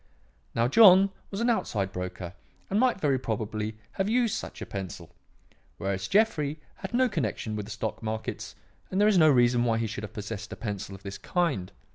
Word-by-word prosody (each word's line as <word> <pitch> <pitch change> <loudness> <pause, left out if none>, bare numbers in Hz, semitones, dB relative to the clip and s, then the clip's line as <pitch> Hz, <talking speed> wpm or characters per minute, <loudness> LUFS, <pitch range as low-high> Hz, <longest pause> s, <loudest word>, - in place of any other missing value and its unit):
Now 115 +1 +3
John 195 - +7 0.2
was 200 +2 -4
an 240 - +2
outside 100 - -1
broker 90 -1 -5 0.4
and 200 - +2
might 250 -5 +3
very 140 -6 +2
probably 110 -1 -3
have 195 +1 -1
used 235 -2 +2
such - - -5
a - - -5
pencil, 90 -4 -7 0.6
whereas 95 0 -2
Jeffrey 160 -8 +2 0.2
had - - -6
no 255 +1 +4
connection 115 - -2
with 105 -1 -4
the - - -8
stock - - -4
markets 110 0 -4 0.3
and 190 - -1
there 210 - +5
is 205 -4 +5
no 155 -1 +7
reason 120 -3 +4
why 115 -2 +2
he 115 - 0
should 105 -1 -5
have 105 +1 -7
possessed 105 -1 -6
a - - -5
pencil 100 -3 -5
of 95 - -14
this 100 0 -7
kind. 155 - -1
115 Hz, 195 wpm, -28 LUFS, -, 0.6 s, John